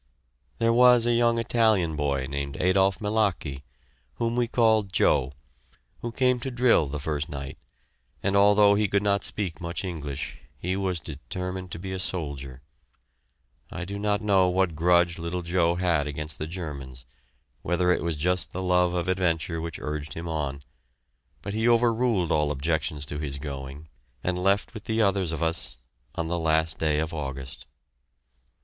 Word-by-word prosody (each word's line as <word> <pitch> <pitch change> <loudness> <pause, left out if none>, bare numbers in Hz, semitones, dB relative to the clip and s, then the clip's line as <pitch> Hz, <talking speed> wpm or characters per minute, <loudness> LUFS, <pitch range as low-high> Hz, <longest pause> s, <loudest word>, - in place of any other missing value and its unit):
There 115 0 +2
was 125 -1 +6
a 120 - +3
young 120 0 +3
Italian 110 -8 +2
boy 70 -3 -1
named 70 0 -4
Adolph 95 +1 +3
Milachi, 105 -10 -1 0.5
whom 115 0 -1
we 120 -1 +1
called 110 -4 +2
"Joe," 70 -6 +3 0.7
who 120 - -4
came 125 +1 +2
to 135 - -4
drill 120 - +3
the 75 +2 -4
first 75 +1 -2
night, 70 -2 -7 0.6
and 100 0 +1
although 100 0 +6
he 105 +1 +2
could 100 +1 +1
not 100 -1 +2
speak 90 -6 -3
much 85 +2 -4
English, 70 -8 -5 0.2
he 90 +2 -2
was 95 -3 -1
determined 90 +5 -6
to - - -5
be 95 +2 -6
a 95 - -3
soldier. 70 -8 -4 1.1
I 90 - -5
do 100 +2 -5
not 105 0 0
know 95 -3 +4
what 90 -1 +1
grudge 85 +1 +3
little 85 +2 -3
Joe 85 0 +2
had 85 -5 +1
against 75 +1 -5
the 75 - -3
Germans, 70 -8 -7 0.6
whether 90 +4 +1
it - - +1
was 85 -1 -1
just 90 +4 0
the 95 - -3
love 90 -1 +2
of 90 +1 -1
adventure 85 -3 0
which 85 -1 -5
urged 75 -1 -5
him 85 +1 -5
on, 70 -4 -3 0.8
but 100 - -4
he 110 +2 +2
overruled 115 -5 +2
all 75 -1 +2
objections 75 0 -1
to 75 0 -5
his 70 -2 -3
going 70 +1 -7 0.4
and 90 0 -1
left 100 +5 +1
with 110 -3 -9
the 110 0 -1
others 95 -5 +2
of 80 0 -2
us, 80 -7 -2 0.4
on 85 - -2
the 85 +1 -1
last 80 0 +1
day 75 -2 +1
of 80 +1 -1
August. 70 -3 -6
85 Hz, 170 wpm, -26 LUFS, 75-100 Hz, 1.1 s, was